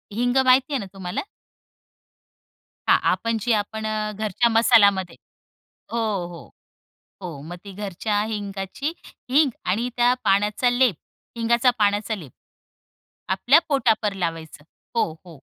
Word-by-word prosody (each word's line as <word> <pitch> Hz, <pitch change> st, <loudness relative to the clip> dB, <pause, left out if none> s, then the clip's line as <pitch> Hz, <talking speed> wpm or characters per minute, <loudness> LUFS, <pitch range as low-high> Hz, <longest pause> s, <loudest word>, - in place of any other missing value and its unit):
हिंग 245 Hz, +3 st, +1 dB
माहिती 260 Hz, +3 st, +4 dB
आहे 275 Hz, -, +2 dB
ना 200 Hz, -, -5 dB
तुम्हाला? 185 Hz, -2 st, -4 dB, 1.7 s
हां, -, -, +7 dB
आपण 230 Hz, 0 st, -1 dB
जी 240 Hz, -, 0 dB
आपण 220 Hz, +1 st, -2 dB
अ, 215 Hz, 0 st, -2 dB
घरच्या 215 Hz, +3 st, 0 dB
मसालामध्ये 200 Hz, -6 st, +4 dB, 0.8 s
हो, 235 Hz, -, -2 dB, 0.3 s
हो, 170 Hz, -1 st, -11 dB, 0.7 s
हो. 165 Hz, -6 st, -7 dB
मग 170 Hz, +4 st, -8 dB
ती 200 Hz, -, -9 dB
घरच्या 205 Hz, +1 st, -2 dB
हिंगाची 205 Hz, -, -4 dB, 0.4 s
हिंग 280 Hz, +2 st, +4 dB, 0.2 s
आणि 225 Hz, +7 st, 0 dB
त्या 245 Hz, +1 st, +4 dB
पाण्याचा 205 Hz, +5 st, +2 dB
लेप, 245 Hz, -6 st, +3 dB, 0.4 s
हिंगाचा 235 Hz, +2 st, +3 dB
पाण्याचा 205 Hz, +1 st, +1 dB
लेप, 155 Hz, -, -11 dB, 1.0 s
आपल्या 245 Hz, +11 st, +5 dB
पोटावर 225 Hz, -7 st, +2 dB
लावायचं. 165 Hz, -5 st, -5 dB, 0.3 s
हो, 225 Hz, -8 st, +1 dB
हो. 165 Hz, -3 st, -12 dB
215 Hz, 125 wpm, -23 LUFS, 195-240 Hz, 1.7 s, हां